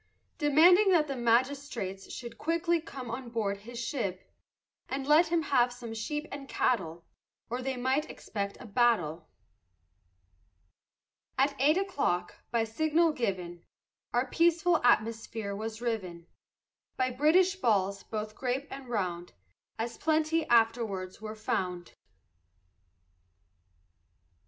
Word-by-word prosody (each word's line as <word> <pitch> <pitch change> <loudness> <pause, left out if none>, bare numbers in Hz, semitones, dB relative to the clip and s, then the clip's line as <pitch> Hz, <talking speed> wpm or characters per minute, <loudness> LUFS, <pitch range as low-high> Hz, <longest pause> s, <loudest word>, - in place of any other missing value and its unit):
Demanding 340 +7 +6
that 310 -3 +4
the 275 - -3
magistrates 240 -5 0
Should 235 -2 -8
quickly 335 +1 +1
come 255 -6 -8
on 245 +1 -5
board 210 -4 -1
his 235 +4 -10
ship, 230 -6 -4 0.6
And 270 0 -3
let 305 +4 +5
him 330 0 +1
have 250 -4 +3
some 240 -2 -8
sheep 295 +7 -3
and 275 -1 -7
cattle, 170 -8 0 0.5
Or 245 +1 -2
they 265 0 -3
might 260 +5 0
expect 200 -2 -5
a - - -10
battle. 200 -9 +1 2.1
At 275 +2 +2
eight 300 +5 +4
o'clock, 285 - -1 0.2
by 235 -1 +1
signal 315 +8 +2
given, 185 - -3 0.5
Our 245 +2 +1
peaceful 340 +3 +3
atmosphere 225 -3 +1
was 220 +2 -5
riven 185 -8 -3 0.7
By 255 0 +1
British 345 +9 +3
balls, 200 - +1
both 215 -1 -5
grape 260 +4 -3
and 270 -2 -8
round, 180 -6 -3 0.4
As 230 +1 -4
plenty 315 +1 +1
afterwards 225 -5 +1
were 215 0 -6
found. 180 -4 -3
240 Hz, 120 wpm, -30 LUFS, 215-295 Hz, 2.1 s, Demanding